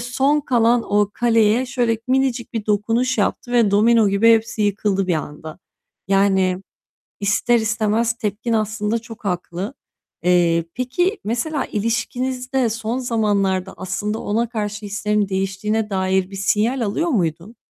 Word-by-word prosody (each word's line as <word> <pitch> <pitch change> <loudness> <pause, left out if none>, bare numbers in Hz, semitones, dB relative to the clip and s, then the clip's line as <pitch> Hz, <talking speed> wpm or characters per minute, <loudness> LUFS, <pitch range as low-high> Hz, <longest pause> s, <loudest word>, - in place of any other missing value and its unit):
son 270 +5 +1
kalan 240 -3 +2
o 205 -1 +3
kaleye 230 0 +3
şöyle 240 -3 0
minicik 260 -2 0
bir 225 -3 -4
dokunuş 225 +4 +1
yaptı 240 +4 -1
ve 235 -4 +4
domino 220 +1 +4
gibi 205 +4 +5
hepsi 225 -1 +1
yıkıldı 200 -1 0
bir 180 - +1
anda. 155 +1 -6 0.5
Yani, 190 -1 +2 0.6
ister 210 +4 +2
istemez 225 +1 +1
tepkin 230 0 -3
aslında 215 0 0
çok 225 -1 -12
haklı. 180 +4 -3 0.5
Eee, 170 -1 +3
peki, 350 - 0
mesela 245 +8 -1
ilişkinizde 250 +4 -1
son 225 +2 -3
zamanlarda 200 -6 0
aslında 205 +4 -3
ona 230 +3 -1
karşı 210 -2 -4
hislerin 210 0 0
değiştiğine 195 +3 -1
dair 190 0 0
bir 195 - -8
sinyal 215 +6 +1
alıyor 230 +10 -1
muydun? 180 - -2
215 Hz, 130 wpm, -20 LUFS, 195-235 Hz, 0.6 s, gibi